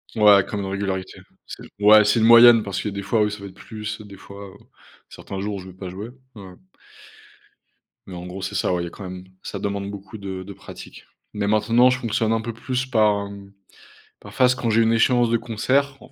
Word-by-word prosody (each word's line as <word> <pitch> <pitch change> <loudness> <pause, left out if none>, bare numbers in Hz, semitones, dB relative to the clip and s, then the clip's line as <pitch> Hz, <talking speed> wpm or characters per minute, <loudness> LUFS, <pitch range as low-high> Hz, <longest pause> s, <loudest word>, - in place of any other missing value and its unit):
Ouais, 105 -3 +6
comme 105 -1 -5
une - - -4
régularité, 95 -1 -4 0.3
c - - -10 0.2
ouais, 105 +1 +7
c'est 110 +3 +2
une 110 - +3
moyenne 115 -1 +8
parce 100 -3 -4
que 105 - -3
des 100 0 -6
fois, 105 +2 +1
oui, 105 - +2
ça 105 - -7
va - - -8
être 95 - -10
plus, 110 +1 -7
des 100 -2 -12
fois, 100 +1 -11
heu, - - -14 0.5
certains 95 - -8
jours, 100 +1 -3
où - - -7
je 95 - -11
vais 95 - -11
pas 95 -2 -7
jouer, 100 +5 -8 0.3
ouais 95 -3 -11 1.5
mais 95 - -9
en 90 - -8
gros, 90 +2 -8
c'est - - -5
ça, - - 0
ouais, 90 - -1
il - - -3
y - - -6
a - - -7
quand 100 - -11
même 90 0 -9 0.2
ça - - -6
demande 100 0 -3
beaucoup 100 +1 -10
de 95 -2 -6
de 100 +1 -10
pratique - - -12 0.3
mais 105 -1 -2
maintenant 115 +4 +4
je 125 - -1
fonctionne 115 -1 0
un 115 - 0
peu 115 +1 -5
plus 125 +3 -3
par, 105 -4 +2
hem, 100 -1 -12 0.7
par - - -13
phase 125 0 +3
quand 115 - -2
j'ai 115 +1 +3
une 115 0 +3
échéance 120 +1 +3
de 115 - +2
concert, 135 +5 -1
105 Hz, 235 wpm, -22 LUFS, 100-115 Hz, 1.5 s, moyenne